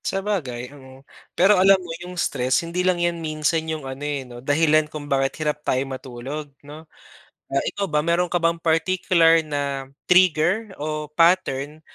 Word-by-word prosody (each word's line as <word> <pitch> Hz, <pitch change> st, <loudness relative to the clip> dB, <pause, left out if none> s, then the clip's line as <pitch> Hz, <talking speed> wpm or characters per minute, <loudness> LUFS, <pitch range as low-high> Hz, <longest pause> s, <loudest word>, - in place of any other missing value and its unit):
Sabagay, 145 Hz, -11 st, -3 dB
mm. 135 Hz, -1 st, -15 dB, 0.3 s
Pero 190 Hz, +1 st, +5 dB
alam 195 Hz, +1 st, +6 dB
mo 175 Hz, -3 st, -8 dB
yung 180 Hz, +1 st, -8 dB
stress 130 Hz, -1 st, 0 dB
hindi 170 Hz, +2 st, -2 dB
lang 185 Hz, -1 st, +2 dB
yan 175 Hz, -1 st, -1 dB
minsan 155 Hz, +1 st, 0 dB
yung 155 Hz, -3 st, -4 dB
ano, 135 Hz, +1 st, -7 dB
eh, 145 Hz, -2 st, -3 dB
'no 120 Hz, -1 st, -11 dB
dahilan 150 Hz, +2 st, +2 dB
kung 150 Hz, -1 st, -7 dB
bakit 135 Hz, +2 st, -1 dB
hirap 150 Hz, 0 st, -1 dB
tayo 130 Hz, -2 st, 0 dB
matulog, 135 Hz, +2 st, -7 dB, 0.2 s
'no? 155 Hz, +2 st, -12 dB, 0.6 s
Ah, 135 Hz, -, -1 dB
ikaw 200 Hz, -1 st, -3 dB
ba 150 Hz, 0 st, 0 dB
meron 170 Hz, +2 st, +1 dB
ka 175 Hz, -, -1 dB
bang 170 Hz, -1 st, +1 dB
particular 165 Hz, 0 st, +3 dB
na 140 Hz, -3 st, -4 dB, 0.2 s
trigger, 185 Hz, +3 st, +3 dB
o 150 Hz, 0 st, -4 dB
pattern 155 Hz, -3 st, +1 dB
155 Hz, 165 wpm, -22 LUFS, 140-175 Hz, 0.6 s, alam